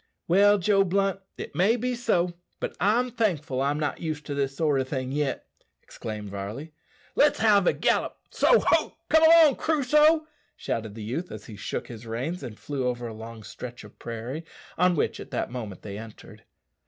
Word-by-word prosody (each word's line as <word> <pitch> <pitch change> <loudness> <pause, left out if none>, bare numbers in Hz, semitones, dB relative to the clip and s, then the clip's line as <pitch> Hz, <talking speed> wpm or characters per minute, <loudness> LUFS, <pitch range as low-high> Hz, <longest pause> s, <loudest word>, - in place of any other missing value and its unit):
"Well, 205 +4 +5
Joe 195 +1 +3
Blunt, 195 +1 0 0.2
it - - -7
may 200 +6 +3
be 250 +1 -1
so, 180 -8 +1 0.3
but - - -4
I'm 240 +5 +2
thankful 165 - 0
I'm 145 +2 0
not 150 -2 -2
used 155 -3 -4
to 145 - -4
this 135 -1 -1
sort 150 -4 +2
o' - - 0
thing 130 -1 -4
yet," 145 -1 -1 0.4
exclaimed 105 -2 -7
Varley. 105 +11 -6 0.4
"Let's 295 0 +4
have 205 -4 +4
another - - +5
gallop - - +1
so - - +4
ho! - - +2
come 320 0 +5
along, 320 -3 +7
Crusoe!" 305 +1 +3 0.3
shouted 110 -2 -4
the 110 - -7
youth 145 +12 -4
as - - -8
he 110 - -9
shook 100 - -4
his 115 -1 -10
reins 130 +11 -3
and 120 -5 -7
flew 135 -3 -3
over 120 -1 -2
a 115 - -7
long 110 0 -9
stretch 120 +3 -8
of - - -15
prairie 120 +7 -5 0.3
on 180 +1 +3
which - - 0
at - - -9
that - - -3
moment 110 -7 -6
they 100 -1 -6
entered. 110 -1 -12
150 Hz, 190 wpm, -26 LUFS, -, 0.4 s, along